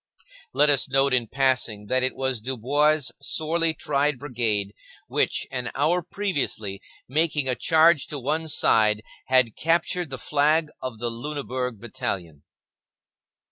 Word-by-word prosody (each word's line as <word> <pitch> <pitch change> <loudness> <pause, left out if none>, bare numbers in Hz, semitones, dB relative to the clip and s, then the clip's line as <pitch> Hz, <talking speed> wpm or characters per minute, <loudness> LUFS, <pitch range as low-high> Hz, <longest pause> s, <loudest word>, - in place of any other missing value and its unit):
Let 150 - +4
us 140 -2 +3
note 135 0 +3
in 120 -3 +3
passing 125 -5 +1
that 130 +5 +1
it 130 - 0
was 130 -4 -1
Dubois's 140 +5 +1
sorely 165 +1 0
tried 145 -1 0
brigade 115 -7 -1 0.3
which, - - 0
an 125 -2 -3
hour 165 +6 +1
previously, 145 - -3 0.3
making 150 0 +1
a 130 - +2
charge 160 +4 +3
to 150 - -5
one 150 +5 -2
side, 110 -7 +3 0.2
had 130 -4 +3
captured 170 +1 0
the 135 - -6
flag 150 +4 +1
of 130 -3 -5
the 120 +1 -3
Lunenburg 125 -2 -4
battalion. 90 -9 -5
135 Hz, 135 wpm, -24 LUFS, 120-150 Hz, 0.3 s, Let